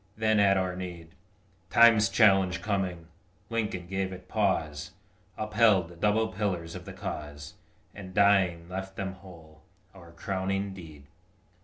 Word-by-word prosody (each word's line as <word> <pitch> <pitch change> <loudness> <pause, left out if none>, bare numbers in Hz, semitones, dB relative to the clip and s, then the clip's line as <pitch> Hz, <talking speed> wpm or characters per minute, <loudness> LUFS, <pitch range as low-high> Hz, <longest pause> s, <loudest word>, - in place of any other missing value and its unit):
then 110 -1 +2
at 100 -1 +4
our 95 -1 -1
need, 90 -3 -7 0.6
Time's 115 -3 +6
challenge 95 -3 +3
coming, 95 -5 -2 0.5
Lincoln 105 -6 -2
gave 95 +1 -3
it 90 -1 -10
pause, 85 -8 -1 0.4
Upheld 105 -4 +3
the 85 - -13
double 105 +5 +1
pillars 90 -4 -3
of - - -9
the - - -8
cause, 75 +1 -7 0.4
And 95 -2 -9
dying 95 -4 +3
left 95 +1 -6
them 95 -1 -4
whole 85 -5 -15 0.3
our 85 -3 -14
crowning 95 +2 -3
deed. 80 -6 -12
95 Hz, 135 wpm, -28 LUFS, 85-100 Hz, 0.6 s, Time's